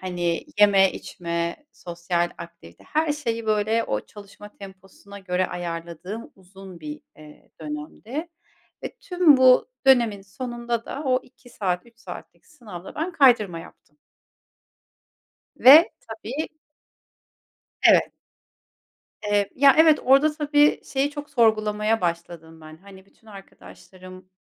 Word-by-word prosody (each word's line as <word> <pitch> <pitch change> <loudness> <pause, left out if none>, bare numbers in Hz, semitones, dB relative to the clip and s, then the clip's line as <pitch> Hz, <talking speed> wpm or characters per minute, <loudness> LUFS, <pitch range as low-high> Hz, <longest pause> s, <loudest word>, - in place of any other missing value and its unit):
hani, 175 -2 -3
yeme, 195 -2 +5
içme, 170 -1 -5 0.2
sosyal 175 0 -3
aktivite, 170 - -13
her 310 0 -1
şeyi, 230 -6 -4
böyle, 215 +2 0
o 105 - -2
çalışma 205 0 -14
temposuna 195 +1 -13
göre 185 -1 -2
ayarladığım 170 +5 -7
uzun 190 -2 -14
bir, 150 -1 -8 0.2
eee, 150 -1 -17
dönemdi 160 - -7 0.6
ve - - -7
tüm 355 -6 +4
bu 255 -1 +5 0.2
dönemin 235 -7 +3
sonunda 235 +3 -5
da 285 - -6
o 255 -1 +2
2 250 -1 -21
saat, 180 -4 -3
3 235 0 -23
saatlik - - -12
sınavda 205 - -12
ben 335 +4 -3
kaydırma 235 - +3
yaptım. 150 -2 -18 1.6
Ve 300 +7 +8
tabii 230 +6 -6 1.3
Evet. - - +4 1.1
Eee, 205 -1 0
ya 275 0 +5
evet, 315 -1 +6
orada 275 +4 +4
tabii, 295 -1 +2
şeyi 275 +1 -1
çok 290 0 -9
sorgulamaya 215 -3 +1
başladım 170 -2 -5
ben, 155 0 -13
hani, 190 +2 -16
bütün 225 - -29
arkadaşlarım, 185 - -14
205 Hz, 120 wpm, -23 LUFS, 175-255 Hz, 1.6 s, Ve